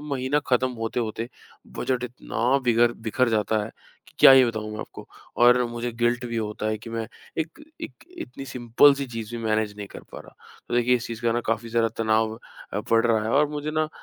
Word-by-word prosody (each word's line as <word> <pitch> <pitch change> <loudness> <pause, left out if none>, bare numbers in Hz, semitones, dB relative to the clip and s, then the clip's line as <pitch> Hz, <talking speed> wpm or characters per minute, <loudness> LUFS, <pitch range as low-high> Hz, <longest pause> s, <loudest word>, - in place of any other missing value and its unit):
महीना 140 -1 -1
खत्म 130 0 +2
होते-होते, 115 0 -3 0.5
बजट 125 -2 -1
इतना 125 +1 -1
बिगर 120 0 +4
बिखर 120 +2 0
जाता 110 -1 +1
है - - -8 0.4
कि - - -22
क्या - - +9
ही 130 -1 +8
बताऊँ 110 -2 -4
आपको। - - -10 0.3
और 125 +1 +6
मुझे 120 0 -4
गिल्ट 120 +1 0
भी 115 -1 -4
होता 105 0 -4
है 110 0 -1
कि 115 +2 -10
मैं 115 -1 -3 0.3
एक 160 - -4 0.2
एक 320 - -6 0.3
इतनी 125 +2 -7
सिम्पल 125 +2 +4
सी 140 0 -4
चीज़ 115 -2 -6
भी 115 - -6
मेनेज 110 -1 0
नहीं 105 -1 -6
कर - - -11
पा - - -7
रहा। - - -15 0.3
तो - - -2
देखिए, 120 +1 +3
इस 120 - -6
चीज़ 115 0 -7
का 115 +1 +2
काफ़ी 115 +1 -1
ज़्यादा 115 0 +2
तनाव 110 0 +1 0.4
अ, - - -1
पड़ 115 0 +2
रहा 110 -2 +2
है 110 - -2
और 145 +4 +3
मुझे 150 0 -4
ना 155 0 0
120 Hz, 210 wpm, -25 LUFS, 110-125 Hz, 0.5 s, क्या